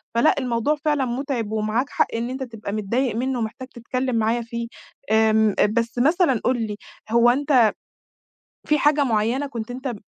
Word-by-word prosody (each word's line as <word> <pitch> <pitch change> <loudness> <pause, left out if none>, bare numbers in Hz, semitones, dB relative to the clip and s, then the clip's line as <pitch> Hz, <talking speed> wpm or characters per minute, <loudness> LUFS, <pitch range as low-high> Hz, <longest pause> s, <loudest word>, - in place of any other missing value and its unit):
فلأ 235 +7 +4
الموضوع 250 +3 0
فعلًا 295 -3 +2
متعب 245 -3 -3
ومعاك 220 +4 -1
حق - - +1
إن 235 +2 -2
أنت 265 +1 -4
تبقى 225 -4 -7
متضايق 225 +3 -1
منه 255 +1 -1
ومحتاج 230 +3 -5
تتكلم 255 +1 -3
معايا 225 +2 +1
فيه، 235 0 -5 0.4
آمم، 220 -1 +3
بس 235 +2 -2
مثلًا 290 - +2
قُل 250 -2 +1
لي 210 - -5 0.4
هو 235 +1 +5
أنت 260 -4 +4 1.0
في 300 - +3
حاجة 295 0 +3
معيّنة 235 +4 0
كنت 235 -2 -6
أنت 255 0 -4
240 Hz, 160 wpm, -22 LUFS, 225-265 Hz, 1.0 s, هو